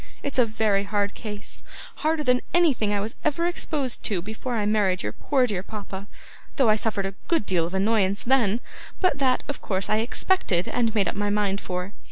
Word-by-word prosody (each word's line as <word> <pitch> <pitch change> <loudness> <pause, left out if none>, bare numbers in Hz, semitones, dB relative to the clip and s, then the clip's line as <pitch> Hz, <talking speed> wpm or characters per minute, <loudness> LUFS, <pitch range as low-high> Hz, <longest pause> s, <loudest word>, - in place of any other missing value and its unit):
It's 280 -2 -2
a 240 - +5
very 215 -2 +1
hard 205 0 0
case 210 -2 -5 0.3
harder 310 0 +1
than 250 -2 +3
anything 285 -12 +3
I 205 - +1
was 215 +3 -3
ever 310 +3 +1
exposed 305 -6 -1
to, 200 -4 +1
before 220 +6 -4
I 210 -2 0
married 205 -3 +2
your - - -2
poor 265 -3 +1
dear 200 -6 -1
papa, 200 -1 -7 0.5
though 265 -6 +4
I 215 - +6
suffered 210 -2 -1
a 195 - -3
good 330 -11 +2
deal 170 -4 +1
of 180 - -5
annoyance 200 0 +2
then 235 -3 +3 0.4
but 365 -7 +2
that, 260 -2 +2
of 285 - -5
course, 190 -1 -1
I 215 - +4
expected, 225 - +1
and 230 -2 0
made 205 -3 +3
up - - -1
my 205 0 -1
mind 205 -1 +1
for. 180 +2 -4
215 Hz, 205 wpm, -25 LUFS, 200-255 Hz, 0.5 s, I